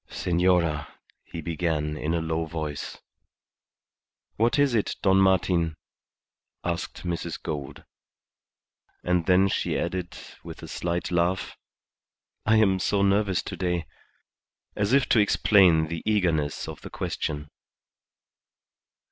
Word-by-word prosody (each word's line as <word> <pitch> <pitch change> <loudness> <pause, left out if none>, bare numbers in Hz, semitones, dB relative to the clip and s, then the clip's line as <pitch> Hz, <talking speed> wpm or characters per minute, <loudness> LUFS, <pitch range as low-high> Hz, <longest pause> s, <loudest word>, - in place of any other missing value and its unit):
"Senora," 85 -3 +1 0.3
he 85 - -7
began, 80 -2 -1
in 75 +2 -2
a 85 - 0
low 80 0 -1
voice. 80 -2 -5 1.4
"What 115 +5 +2
is 145 -3 +3
it, 110 -3 0
Don 95 -1 +4
Martin?" 90 -4 +2 0.9
asked 85 -1 -4
Mrs. 85 -1 -3
Gould. 75 -3 -6 1.2
And 90 -2 +1
then 95 +1 +5
she - - -1
added, 90 -2 -3 0.3
with - - -10
a - - -7
slight 85 +1 -3
laugh, 90 +2 0 0.9
"I 110 - +5
am 100 -4 +4
so 100 +2 +1
nervous 100 -1 +2
to - - -6
day," 90 -2 -1 0.9
as 105 +1 0
if 135 0 +4
to 115 - +5
explain 95 -5 +5
the 80 +1 -5
eagerness 85 -9 0
of - - -8
the - - -9
question. 75 -1 -4
85 Hz, 120 wpm, -26 LUFS, 80-95 Hz, 1.4 s, then